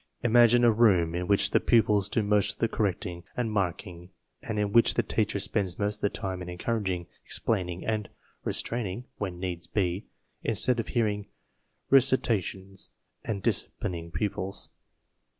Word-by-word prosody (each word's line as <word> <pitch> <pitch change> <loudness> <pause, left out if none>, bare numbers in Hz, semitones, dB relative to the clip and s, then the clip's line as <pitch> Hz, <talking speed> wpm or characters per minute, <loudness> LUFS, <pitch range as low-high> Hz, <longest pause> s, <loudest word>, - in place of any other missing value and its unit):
Imagine 120 0 +5
a 120 - +7
room 95 -8 +4
in 90 +1 -2
which 100 -1 +3
the - - +4
pupils 105 -3 +3
do 110 - +1
most 105 0 +2
of - - -17
the 115 - +1
correcting 90 -5 -2
and 120 -3 -1
marking 90 -3 -3 0.3
and 110 - -4
in 105 -1 0
which 115 - +5
the 120 - +2
teacher 105 -1 0
spends 95 -2 -1
most 105 0 -1
of - - -16
the 100 - +2
time 95 -2 -4
in 90 - -6
encouraging, 95 -1 -2 0.2
explaining, 90 -5 -1
and 110 -2 -1 0.3
restraining 115 0 -2
(when 95 -4 -3
need 90 -2 -3
be) 95 -1 0 0.3
instead 125 -2 +1
of 115 - -2
hearing 105 -3 0 0.6
"recita 130 -5 +4
tions 95 +2 -7 0.2
" - - -48
and 105 -5 -3
disciplining 85 -2 -1
pupils. 95 +1 -3
100 Hz, 160 wpm, -28 LUFS, 90-110 Hz, 0.6 s, a